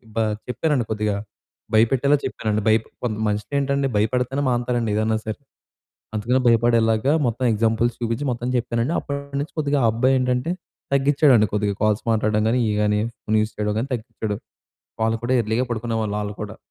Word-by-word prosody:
బ 115 - 0 0.3
చెప్పానండి 125 0 0
కొద్దిగా 105 -1 0 0.6
భయపెట్టేలా 135 +6 +4
చెప్పానండి 110 -4 -1
బై‌ప్ 110 0 +3 0.2
కొంత 110 -3 -1
మనుషులు 105 +3 -3
ఏంటండి 140 0 0
భయపడితేనే 125 +5 0
మానతారండి 120 -2 0
ఏదైనా 110 +1 +1
సరే. 110 -1 -4 0.8
అందుకనే 120 +5 +1
భయపడేలాగా, 115 +2 +3
మొత్తం 120 +2 -1
ఎగ్జాంపుల్స్ 115 +2 +1
చూపించి 115 +4 -1
మొత్తం 120 +1 -3
చెప్పానండి. 120 +5 -1
అప్పటినుంచి 140 +1 -5
కొద్దిగా 145 -1 +1
ఆ - - +5
అబ్బాయి 125 +4 +2
ఏంటంటే, 125 +5 0 0.4
తగ్గించాడండి 140 -5 +4
కొద్దిగా 105 -1 +1
కాల్స్ 105 -1 +2
మాట్లాడడం 110 -1 +1
కానీ, 125 +1 +2
ఇవి 105 - 0
కానీ 105 0 +2 0.2
ఫోన్ 110 +1 0
యూజ్ 110 0 -3
చేయడం 105 0 -1
గాని 130 - -3
తగ్గించాడు. 110 -3 -4 0.7
వాళ్ళు 110 0 +1
కూడా 130 +2 +1
ఎర్లీగా 110 +4 0
పడుకునేవాళ్ళు. 110 -2 -2
వాళ్ళు 105 0 -4
కూడా, 105 +1 -7
115 Hz, 155 wpm, -22 LUFS, 110-125 Hz, 0.8 s, ఆ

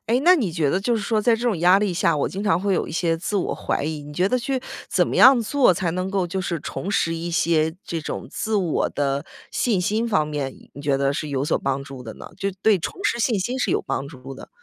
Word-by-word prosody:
哎， 240 +3 +2
那 365 +1 +8
你 205 - -1
觉 155 -4 +1
得 190 - +1
就 235 +4 +1
是 215 - -3
说 215 +1 +1
在 230 +1 +3
这 230 - -4
种 225 -8 +1
压 180 +3 +5
力 205 -3 0
下， 165 -2 +2
我 145 - 0
经 195 +2 -5
常 185 -4 +2
会 200 -1 +1
有 - - 0
一 - - -7
些 165 -1 +1
自 195 +5 -3
我 185 - -1
怀 - - -2
疑， 155 -1 -3
你 150 +1 -10
觉 180 +5 +1
得 255 - +1
去 260 +1 -2 0.3
怎 - - +2
么 - - -2
样 260 -2 +8
做， 245 -2 +3
才 170 -1 -1
能 185 +1 -2
够 195 -3 0
就 190 +2 -3
是 170 -3 -2
重 195 - -5
拾 165 -4 +1
一 170 +1 -4
些 160 -1 +1
这 165 - -3
种 150 - -5
自 220 -1 -3
我 180 -6 +1
的 140 +1 -1 0.3
信 215 -7 +1
心 215 +5 0
方 155 -8 +2
面， 145 -3 -3 0.2
你 140 - -9
觉 140 -1 +1
得 140 0 +1
是 150 +1 -3
有 140 -1 -1
所 - - +1
帮 135 0 -2
助 135 -2 -9
的 110 -2 -8
呢？ - - -10
就 195 - -2
对 215 -4 +4
重 165 - -4
拾 235 - +1
信 225 -2 +1
心 245 +8 -2
是 - - 0
有 - - +1
帮 140 - -3
助 135 -2 -10
的。 - - -11
180 Hz, 295 characters per minute, -23 LUFS, 150-210 Hz, 0.3 s, 那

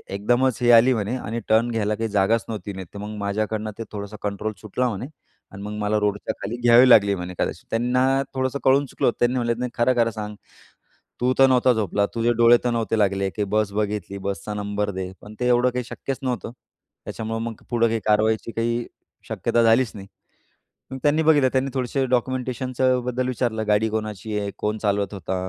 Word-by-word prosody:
एकदमच 120 +5 +1
हे 120 - +4
आली 120 +3 +7
म्हणे 110 +2 -2
आणि 115 -1 -4
टर्न 115 +2 +3
घ्यायला 110 -1 0
काही 115 +1 -3
जागाच 105 +3 +2
नव्हती 105 -2 -5
नाही 95 -1 -7
तर 100 - -8
मग 105 +1 -6
माझ्याकडनं 105 +1 -2
ते 115 - -2
थोडंसं 105 0 -6
कंट्रोल 105 +1 -3
सुटला" 125 +4 -1
म्हणे 115 +2 -4 0.5
"आणि 100 0 -9
मग 105 +1 -5
मला 105 +1 +1
रोडच्या 105 0 -1
खाली 110 +4 -4
घ्यावी 120 +2 +7
लागली 100 -4 +6
म्हणे 90 0 -6
कदाचित." - - -2
त्यांना 125 +3 +2
थोडंसं 130 +1 -1
कळून 135 +2 +4
चुकलं. 120 - 0
त्यांनी 120 +1 +2
म्हणले, 120 -1 +1
"नाही 125 -1 -3
खरं 125 +1 +2
खरं 115 -1 +3
सांग. 105 -1 -6 0.9
तू 125 +1 +2
तर 135 - +8
नव्हता 125 0 +4
झोपला? 100 -1 0
तुझे 115 +1 +2
डोळे 120 +1 +7
तर 120 - +2
नव्हते 115 -1 -1
लागले? 100 -1 +1
की 105 +1 -2
बस 105 -2 +1
बघितली 105 -1 -3
बसचा 100 +1 -4
नंबर 105 0 -2
दे." 95 0 -5
पण 105 +1 -12
ते 125 - +1
एवढं 125 +1 +4
काही 125 0 -3
शक्यच 135 +2 -5
नव्हतं. 125 -3 -3 0.5
त्याच्यामुळं 115 0 -4
मग 115 -2 -6
पुढं 115 -1 +3
काही 115 0 -1
कारवाईची 110 +2 +2
काही 115 +1 -1 0.4
शक्यता 120 - +1
झालीच 115 +1 +4
नाही. 100 -1 -9 0.8
मग 130 - -5
त्यांनी 150 +2 +3
बघितलं. 145 -4 +4
त्यांनी 135 +1 0
थोडेसे 130 +1 -1
डॉक्युमेंटेशनचं 130 0 0
बद्दल 125 +1 -1
विचारलं. 115 -3 -1
गाडी 105 +1 +3
कोणाची 110 -1 -3
आहे? 100 -1 -3
कोण 105 +1 -1
चालवत 100 -1 -1
होता? 95 -1 -4
115 Hz, 195 wpm, -23 LUFS, 105-125 Hz, 0.9 s, तर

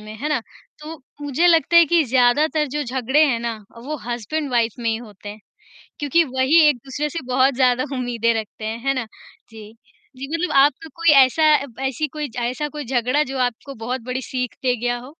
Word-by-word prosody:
में, 215 0 -10
है 295 +7 -4
ना? 295 -5 0 0.4
तो 310 +2 -9 0.2
मुझे 290 +4 +1
लगता 335 0 +4
है 340 - +9
कि 335 +1 +3
ज़्यादातर 265 +5 +2
जो 295 - -1
झगड़े 260 +4 +1
हैं 240 -4 0
ना, 235 -1 -3 0.2
वो 295 +6 -5
हस्बैंड-वाइफ 240 0 -1
में 230 -1 -2
ही 220 - -1
होते 210 -3 -11
हैं। 210 +1 -9 0.6
क्योंकि 295 +4 +2
वही 260 +4 +3
एक-दूसरे 275 +3 -3
से 335 - -5
बहुत 260 +1 +2
ज़्यादा 255 -1 +2
उम्मीदें 235 -2 0
रखते 215 0 -9
हैं, 225 +1 -4
है 275 - +3
ना? 255 -3 -3 0.4
जी। 220 -1 -12 0.4
जी, 270 +1 -6
मतलब 345 +2 -1
आपको 290 +3 +3
कोई 335 -1 +2 0.2
ऐसा 310 +5 -1 0.2
ब 250 -1 -16
ऐसी 285 +4 -2
कोई 300 +1 -5
ज 240 - -13
ऐसा 255 +5 -2
कोई 295 -2 -7
झगड़ा 255 +4 +1
जो 270 -1 -6
आपको 250 +3 -2
बहुत 250 0 -3
बड़ी 255 +2 -4
सीख 250 -2 -4
दे 250 -1 +2
गया 245 +1 -2
हो? 265 +5 -13
260 Hz, 200 wpm, -21 LUFS, 240-300 Hz, 0.6 s, है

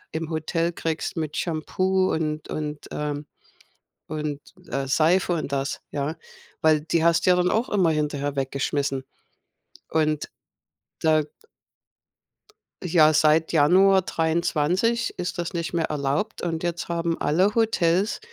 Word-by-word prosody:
im 160 0 -4
Hotel 165 +2 -1
kriegst 165 0 -3
mit 155 -2 -3
Shampoo 185 +3 0
und 155 -1 -2
und, 150 -1 -4
ähm, 150 0 -3 0.8
und 150 -2 -3 0.3
äh, 135 0 -2
Seife 165 +6 +3
und 155 -4 -4
das, 140 0 -2
ja. 145 +3 -3 0.4
Weil 155 -1 +3
die 160 +1 0
hast 170 -1 +3
du - - +6
ja 180 - +5
dann 180 0 +2
auch 230 +4 0
immer 185 -5 +3
hinterher 145 -2 -1
weggeschmissen. 135 0 -1 0.8
Und, 155 -1 0 0.7
da 155 -1 +3 1.6
Ja, 160 -3 +5
seit 155 +2 +3
Januar 185 +5 +5
23 170 +7 0
ist 180 0 -4
das 170 - -3
nicht 170 -1 -3
mehr 165 -1 +1
erlaubt. 150 +8 -2
Und 165 -2 -2
jetzt 175 0 -2
haben 170 -1 -1
alle 185 +7 +2
Hotels 200 -3 +2
160 Hz, 130 wpm, -24 LUFS, 150-175 Hz, 1.6 s, du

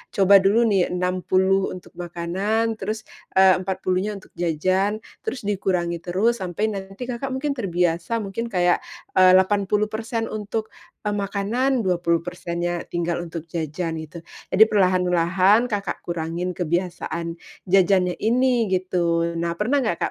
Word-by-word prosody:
coba 195 0 +7
dulu 205 +5 +3
nih 195 -5 +3
60 185 +1 +1
untuk 180 - -12
makanan, 195 +7 -1
terus, 215 +3 -4 0.3
eee, 190 -1 +6
empat 190 0 -4
puluhnya 185 +3 0
untuk 195 - -13
jajan, 185 +6 0 0.2
terus 250 0 -3
dikurangi 180 -4 -1
terus, 205 +8 0
sampai 190 +4 -2
nanti, 195 +3 -7
Kakak, 245 +2 -4
mungkin 285 +2 -1
terbiasa, 180 -1 -1
mungkin 215 +4 -4
kayak, 180 -4 +2 0.3
eee, 185 0 +6
80% 210 +4 0
untuk, 215 +1 -4 0.3
eee, 210 - -1
makanan, 210 +5 0
20% 170 -1 -1
nya 175 0 -1
tinggal 175 0 -2
untuk 165 -2 -6
jajan, 160 0 -3
gitu. 160 +2 -9 0.3
Jadi 215 - +9
perlahan-lahan, 185 +3 +3
Kakak, 205 -4 -3
kurangin 170 +2 -3
kebiasaan 170 -1 -2 0.3
jajannya 185 -1 +3
ini, 240 -1 +2
gitu. 170 -2 0
Nah, 170 0 -2
pernah 265 +7 +1
enggak, 175 -8 -1
190 Hz, 130 wpm, -23 LUFS, 175-210 Hz, 0.3 s, Jadi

